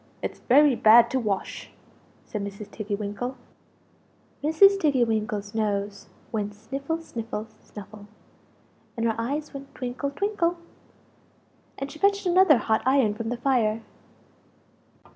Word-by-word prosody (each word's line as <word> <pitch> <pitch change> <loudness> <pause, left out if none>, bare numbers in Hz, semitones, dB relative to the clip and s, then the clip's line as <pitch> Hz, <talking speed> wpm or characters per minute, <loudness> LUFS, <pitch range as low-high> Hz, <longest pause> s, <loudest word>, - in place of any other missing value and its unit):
It's - - -4
very 285 +2 +5
bad 230 +1 +6
to 260 - +1
wash!" 205 -5 -3 0.6
said 210 -2 -5
Mrs. 200 +1 -8
Tiggy 210 -1 -4
winkle. 210 +5 -4 1.1
Mrs. 390 +6 +5
Tiggy 280 -8 +3
winkle's 215 -2 -2
nose 205 -2 -2 0.2
went 210 -2 -3
sniffle, 275 +9 -4
sniffle, 230 -8 -6
snuffle, 205 0 -12 0.9
and 230 - -1
her 225 - +2
eyes 290 +7 -3
went 275 0 -10
twinkle, 255 +3 -3
twinkle; 355 +1 -1 1.2
and 275 +1 -5
she 310 - -12
fetched 400 +1 +2
another 360 -5 +5
hot 220 0 0
iron 260 -5 +3
from 225 +1 -5
the 245 - -2
fire. 230 -4 +1
235 Hz, 125 wpm, -25 LUFS, 215-280 Hz, 1.2 s, bad